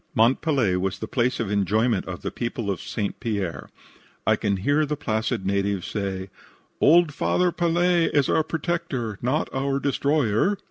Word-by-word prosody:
Mont 115 +4 +4
Pelee 130 - +1
was 95 +1 -2
the 110 - -5
place 125 +2 0
of 110 -3 -2
enjoyment 105 +4 +1
of - - -6
the - - -3
people 115 -3 -3
of 95 - -4
St. 105 -4 -4
Pierre. 100 -7 -3 0.6
I - - +4
can 100 -1 -1
hear 145 +11 +2
the 150 0 -1
placid 110 -4 -2
natives 100 -1 0
say: 95 -2 -4 0.5
"Old 165 0 +5
Father 180 +4 +1
Pelee 175 0 +2
is 145 -3 +2
our 160 - +2
protector 160 - -3
not 130 +6 0
our 135 +1 0
destroyer." 140 - +1
120 Hz, 165 wpm, -24 LUFS, 100-150 Hz, 0.6 s, Old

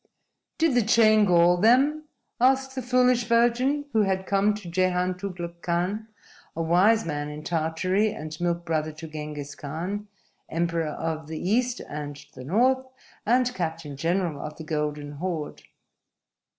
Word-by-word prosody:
_"Did 325 -3 +2
the 245 - +4
chain 215 -1 +5
gall 175 -1 +5
them?" 270 +9 +3 0.3
asked 265 +2 +3
the 260 - -3
Foolish 250 -1 +3
Virgin, 240 +5 +2
who 220 - +4
had 190 -2 0
come 200 +2 +2
to 210 -4 -9
Jehan 180 +1 +1
Tugluk 175 -2 -7
Khan, 180 +6 -1 0.5
a 165 - -2
wise 190 +7 +4
man 145 -2 -3
in 150 +1 -8
Tartary 175 +6 0
and 155 -3 -7
milk 170 0 -1
brother 155 -1 -1
to 160 +1 -9
Ghengiz 150 -2 -7
Khan, 180 +8 -5 0.4
Emperor 165 -1 -1
of 160 0 -4
the 160 0 -5
East 240 +6 0
and 145 -1 -6 0.2
the 130 - -10
North 250 - +2 0.4
and 250 +2 +3
Captain 160 - -4
General 165 0 -1
of 150 0 -7
the 160 - -7
Golden 150 -2 -3
Horde. 155 0 -4
180 Hz, 150 wpm, -26 LUFS, 160-225 Hz, 0.5 s, chain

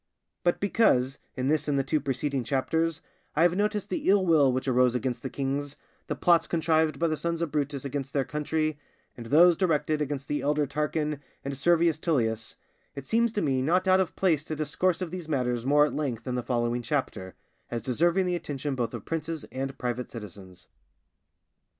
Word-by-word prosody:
But 175 - +2
because, 135 - +2 0.2
in 130 0 -2
this 150 0 +1
and 145 -1 +1
the 135 - +2
two 150 +3 0
preceding 135 0 -1
Chapters, 155 +6 0 0.3
I 160 - +4
have 175 0 +4
noticed 210 0 -1
the 185 - -1
ill 195 -1 +4
will 150 -6 +5
which 130 +2 -2
arose 125 -1 +3
against 125 0 -2
the 130 - -4
kings, 140 +1 -3 0.3
the - - -2
plots 170 -1 +3
contrived 160 -1 +1
by 170 - +1
the 155 - 0
sons 170 +1 -2
of 170 -3 -2
Brutus 145 -2 -2
against 140 0 -4
their 140 -2 0
country, 150 +2 -2 0.4
and 115 -1 -9
those 170 +6 +6
directed 155 -4 +1
against 140 -2 -3
the 145 - -1
elder 150 +1 +1
Tarquin 150 +1 -2 0.3
and 140 0 -3
Servius 165 +2 +3
Tullius, 115 -9 -1 0.4
it 140 -1 -7
seems 230 +4 +2
to 205 - -1
me 130 -2 +1
not 180 +7 +1
out 185 0 +5
of 185 -3 -1
place 165 -6 +2
to 155 - -4
discourse 170 +5 0
of 170 - -6
these 175 -3 -6
matters 125 -4 -1
more 145 +1 +5
at 150 - -3
length 135 -7 -3
in 125 - -3
the 125 - -1
following 120 0 -1
Chapter, 115 -8 -3 0.3
as 115 -2 -4
deserving 170 +9 +2
the 180 - 0
attention 145 -4 -3
both 120 -3 -2
of - - -8
princes 165 -1 -4
and 135 +1 -4
private 125 0 -3
citizens. 95 -5 -10
145 Hz, 195 wpm, -27 LUFS, 130-165 Hz, 0.4 s, those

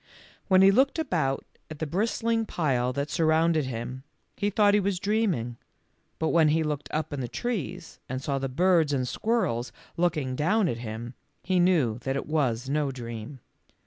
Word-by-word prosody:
When 190 -1 +6
he 195 - +8
looked 265 +9 +3
about 165 - -1 0.2
at 155 - -7
the 160 - -2
bris 195 +9 -1
tling 225 -1 0
pile 130 -9 0
that 140 +2 -3
surrounded 160 -1 +2
him, 125 +1 -5 0.3
he 205 +1 0
thought 205 0 +4
he 210 - +5
was 200 -1 0
dreaming, 185 - 0 0.6
but 160 - 0
when 165 -2 +4
he 160 +2 +2
looked 150 -1 -3
up 155 0 -2
in 145 - -3
the 125 - -3
trees 205 - -4
and 130 +1 -2
saw 135 +1 -2
the 135 0 -2
birds 165 +1 +3
and 130 -2 0
squirrels 130 - -1 0.3
looking 155 -7 0
down 180 +8 +2
at 120 -7 -2
him, 115 +1 -6 0.3
he 185 -1 +1
knew 155 -11 +3
that 135 +2 -2
it 140 - -2
was 130 -6 0
no 145 0 0
dream. 120 +1 -7
150 Hz, 180 wpm, -27 LUFS, 130-185 Hz, 0.6 s, he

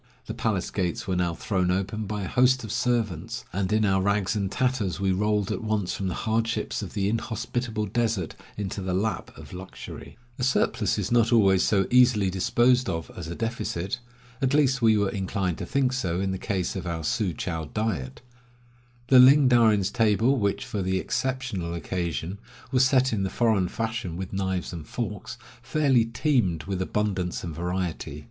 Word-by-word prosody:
The - - -5
palace - - -1
gates 90 -3 -2
were 95 - 0
now 90 -2 0
thrown 90 -2 0
open 100 +3 -1
by 105 0 -3
a - - -3
host 130 +2 +3
of 110 - -6
servants, 115 -1 -1
and 95 +1 -1
in 110 0 +3
our 95 -1 +2
rags 100 +1 +1
and 100 -2 -1
tatters 125 -9 0
we 95 -1 +1
rolled 105 +1 +1
at - - -2
once 105 -4 -1
from 95 - -3
the 90 - -2
hardships 115 +1 -1
of 100 -2 -7
the 100 -1 +1
inhospitable 115 0 -2
desert 110 -4 -1 0.2
into 100 -1 -4
the 90 -1 -2
lap 100 -1 -1
of - - -11
luxury. 95 +4 -9 0.2
A - - -2
surplus 130 - +1
is - - -2
not 115 -1 +3
always 95 -5 +5
so 95 -2 +2
easily 120 -6 +5
disposed 120 +6 +2
of 80 -3 -4
as 85 -3 -6
a 85 - -5
deficit 115 -4 -3 0.2
— 125 +1 -25
at 135 +1 +2
least 135 -3 +3
we 110 -2 +5
were 100 -2 +1
inclined 95 -3 -2
to - - -5
think 135 -2 +1
so 90 -9 -1
in 95 0 -1
the 95 - -3
case 95 -4 -2
of 90 -2 -4
our 85 -1 -3
Su 95 +4 0
chou 80 -2 -4
diet. 100 - -3 0.9
The 130 - +8
Ling 135 +2 +8
Darin' 115 -4 +5
s 95 +1 -1
table, 115 +3 +3
which, 100 -2 0
for 105 - -3
the 95 0 0
exceptional 115 -7 -2
occasion, 85 +2 -3 0.3
was 130 -1 +4
set 130 -2 +3
in 105 - 0
the 95 - 0
foreign 110 -6 +2
fashion 110 -6 -3
with 95 +1 -6
knives 95 -2 -2
and 80 -3 -7
forks, 110 0 -5 0.2
fairly 135 -4 +2
teemed 115 - 0
with 95 -1 -3
abundance 95 -2 -1
and 85 -2 -5
variety. 85 -3 -3
100 Hz, 190 wpm, -26 LUFS, 95-115 Hz, 0.9 s, The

